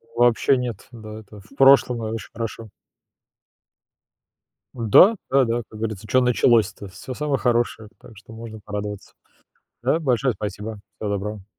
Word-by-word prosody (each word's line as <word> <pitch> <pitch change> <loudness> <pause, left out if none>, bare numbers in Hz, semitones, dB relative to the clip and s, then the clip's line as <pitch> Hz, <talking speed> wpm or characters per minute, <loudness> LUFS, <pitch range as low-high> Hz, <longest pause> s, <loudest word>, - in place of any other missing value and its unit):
Вобще 120 +3 +3
нет. 120 -5 -5
Да, 110 -2 -9
это 105 -1 -14
в 110 +8 -20
прошлом, 135 -4 +5
и 110 - -3
очень 110 -3 -6
хорошо. 115 -1 -6 2.1
Да. 125 - +6
Да-да, 120 -3 +2
как 110 - -11
говорится: 110 -1 -4
"Чё 130 +5 +3
началось-то?" 115 -4 +2
Всё 95 +8 -9
самое 145 0 -1
хорошее, 120 -3 0
так 115 - -15
что 110 +2 -14
можно 110 -1 -9
порадоваться. 105 -1 -6 0.7
Да, 135 +6 +2
большое 130 -4 0
спасибо. 105 +1 -6 0.2
Всего 105 -2 -3
доброго. 100 0 -5
115 Hz, 140 wpm, -22 LUFS, 105-125 Hz, 2.1 s, Да